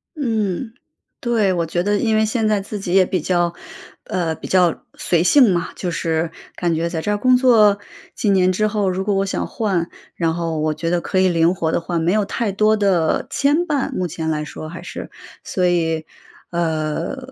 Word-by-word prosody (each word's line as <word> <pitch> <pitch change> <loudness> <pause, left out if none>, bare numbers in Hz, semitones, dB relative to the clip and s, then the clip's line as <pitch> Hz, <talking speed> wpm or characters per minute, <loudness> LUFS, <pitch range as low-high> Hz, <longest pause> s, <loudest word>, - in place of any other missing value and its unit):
嗯。 225 - -2 0.5
对。 225 -5 +1
我 170 -2 0
觉 175 +2 -1
得 205 +1 +1
因 220 +1 +1
为 220 0 +3
现 220 0 0
在 210 -2 +1
自 205 +1 -6
己 180 -2 -3
也 190 -1 +6
比 185 - -1
较 175 +1 +1 0.5
呃， 165 -3 -1
比 - - -9
较 180 -3 +2
随 170 -1 +1
性 250 +1 +6
嘛， 175 0 -1
就 180 - -3
是 165 -1 -1 0.3
感 175 -2 0
觉 165 +1 -1
在 165 -2 -3
这 205 - -3
儿 205 - +1
工 255 +4 +4
作 220 -5 +5 0.3
几 210 - -1
年 185 -2 +4
之 215 +3 +1
后， 210 -2 0
如 185 +1 -2
果 205 0 0
我 195 0 +1
想 195 - -2
换， 190 -7 -1 0.3
然 165 -2 0
后 165 -2 -2
我 155 0 0
觉 165 - -3
得 175 -1 +1
可 185 - -1
以 190 - +4
灵 170 0 +2
活 160 -3 -1
地 - - 0
换， 170 0 -2
没 170 +3 +2
有 215 -1 +2
太 225 +1 -2
多 215 +2 +3
的 185 -6 +1
牵 280 +1 +2
绊， 285 -2 -1
目 185 -8 -2
前 160 0 -4
来 150 -1 -1
说 155 +1 -8
还 170 +1 -9
是。 - - -7 0.3
所 185 - -1
以， 165 -3 +1 0.5
呃， 160 - -2
185 Hz, 225 characters per minute, -20 LUFS, 170-210 Hz, 0.5 s, 也